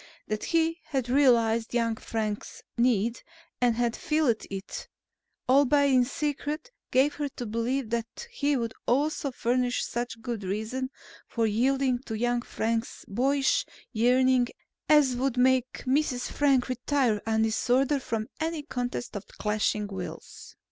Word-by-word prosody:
That 215 0 -2
he 330 0 +1
had 265 -5 -2
realized 235 -4 +3
young 230 -1 +1
Frank's 215 -2 -4
need 235 -1 +1 0.4
and 240 -2 +3
had 235 0 0
filled 305 -9 +1
it, 195 0 -6 0.6
albeit 280 +1 +4
in 250 -1 +5
secret, 300 - -3 0.2
gave 270 +3 +3
her 290 -1 -3
to 245 - -5
believe 230 +2 -1
that 235 - -3
he 290 - +1
would 230 -2 -2
also 290 +4 +1
furnish 245 0 0
such 240 -1 -4
good 230 -3 -4
reason 220 +7 -3 0.4
for 230 -2 0
yielding 255 +3 +2
to 225 - -3
young 240 +1 +1
Frank's 230 0 -3
boyish 270 +6 +2 0.3
yearning 250 +2 +4 0.4
as 290 -4 +5
would 255 0 -1
make 255 0 +3
Mrs. 260 -2 0
Frank 275 -4 +3
retire 255 -3 +1
in 220 0 +2
disorder 255 +5 +2
from 225 -4 -3
any 320 -1 -2
contest 245 -5 -4
of 205 - -6
clashing 210 0 0
wills. 190 -3 -8
245 Hz, 135 wpm, -28 LUFS, 230-275 Hz, 0.6 s, in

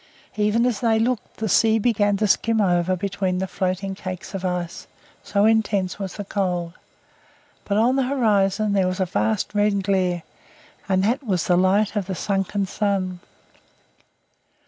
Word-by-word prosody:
Even 215 +3 +2
as 245 -5 0
they 225 -2 +2
looked, 235 +1 -2
the 220 - -2
sea 220 +3 +4
began 205 -3 +2
to 215 - +1
skim 225 +2 +2
over 180 -2 +2
between 190 0 -2
the 190 - -1
floating 190 0 -2
cakes 185 -1 -7
of 195 -1 -4
ice, 180 -2 -3 0.3
so 200 0 +1
intense 210 -4 +1
was 195 -2 -5
the 205 - -5
cold; 180 -4 -2 0.9
but 200 - 0
on 245 +5 +3
the - - +3
horizon 210 -5 +2
there 190 -2 +2
was 185 +1 -3
a 190 - +2
vast 110 - -1
red 205 -1 +1
glare, 185 -3 0 0.7
and 190 0 +2
that 235 +7 +1
was 190 -8 -1
the 180 - +3
light 195 +4 +2
of 200 -3 -1
the 190 - -3
sunken 195 +1 -1
sun. 190 -2 -1
195 Hz, 165 wpm, -23 LUFS, 185-215 Hz, 0.9 s, sea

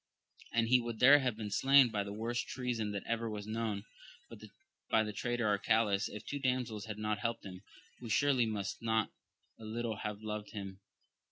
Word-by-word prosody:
And 115 -1 +2
he 125 0 +6
would 120 -1 -5
there 140 +5 +8
have 125 -5 -1
been 105 -2 -5
slain 135 +3 +6
by 105 -2 -1
the 100 - -6
worst 115 +3 -2
treason 120 -5 -2
that 100 -1 -4
ever 115 0 -1
was 105 -1 -5
known, 110 -2 -2 1.1
by 110 - +4
the 105 -1 -4
traitor 120 +1 -1
Arcalaus, 105 -1 +2
if 105 0 -8
two 145 - -4
damsels 125 -5 -1
had 110 -2 -6
not 105 0 -1
helped 115 +1 -3
him, 90 -1 -8 0.4
who 120 - -8
surely 130 0 +3
must 100 -3 -3
not 110 -2 +1 0.5
a - - -11
little 110 0 -3
have 105 -1 -5
loved 105 -1 -5
him. 100 -2 -6
110 Hz, 185 wpm, -34 LUFS, 105-120 Hz, 1.1 s, there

